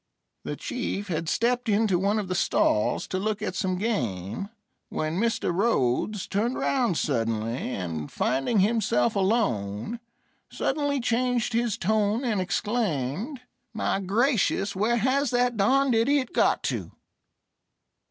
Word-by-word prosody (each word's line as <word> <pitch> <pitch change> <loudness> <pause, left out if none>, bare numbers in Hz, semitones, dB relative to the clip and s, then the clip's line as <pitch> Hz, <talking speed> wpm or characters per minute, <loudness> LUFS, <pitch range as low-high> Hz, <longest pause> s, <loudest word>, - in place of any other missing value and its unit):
The - - -4
Chief 205 -5 -4
had 165 -1 -2
stepped 245 +1 +1
into 205 -3 +2
one 200 +3 +1
of 205 -3 -2
the 185 - -2
stalls 105 -10 +1
to 185 - -1
look 215 +1 -1
at 205 - -2
some 185 -1 -1
game, 120 - -2 0.4
when 155 +3 -2
Mr. 230 -5 0
Rhodes 195 - +1
turned 225 +6 -1
round 245 - +1
suddenly, 115 -2 -1 0.2
and, 80 -5 -4
finding 135 - +1
himself 200 - +2
alone, 190 - 0 0.5
suddenly 285 0 0
changed 245 0 0
his 230 -2 0
tone 215 +4 +1
and 215 -5 +1
exclaimed: 205 - -2 0.3
"My 195 - 0
gracious, 200 -1 +1
where 220 +5 +2
has 260 +4 +1
that 245 0 +1
darned 260 +6 +3
idiot 255 +3 +2
got - - +2
to?" - - -3
210 Hz, 130 wpm, -26 LUFS, 170-235 Hz, 0.5 s, darned